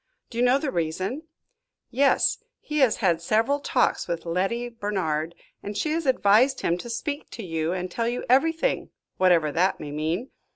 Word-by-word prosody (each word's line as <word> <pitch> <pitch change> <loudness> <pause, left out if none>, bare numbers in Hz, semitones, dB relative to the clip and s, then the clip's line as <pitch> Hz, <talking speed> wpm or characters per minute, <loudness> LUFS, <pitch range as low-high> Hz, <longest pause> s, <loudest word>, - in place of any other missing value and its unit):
"Do 235 - -4
you - - +3
know 250 +2 +5
the 280 -1 -2
reason?" 190 - -3 0.6
"Yes. 270 +3 +3 0.2
He 300 0 -3
has 260 -5 +4
had 170 -2 +2
several 225 +10 +1
talks - - +1
with 170 0 -3
Letty 195 +8 -1
Bernard, 185 -8 -2 0.3
and 205 0 -6
she 305 - -1
has 325 -1 -1
advised 250 +2 +4
him 170 - +1
to 235 - -7
speak 285 +6 -4
to 225 - -8
you, 165 -1 -2
and 180 0 -3
tell 230 +3 -1
you 245 +1 -2
everything, 325 - +2 0.3
whatever 175 -5 +3
that 180 +5 +1
may 145 - -7
mean. 160 - -2
210 Hz, 175 wpm, -25 LUFS, 170-260 Hz, 0.6 s, know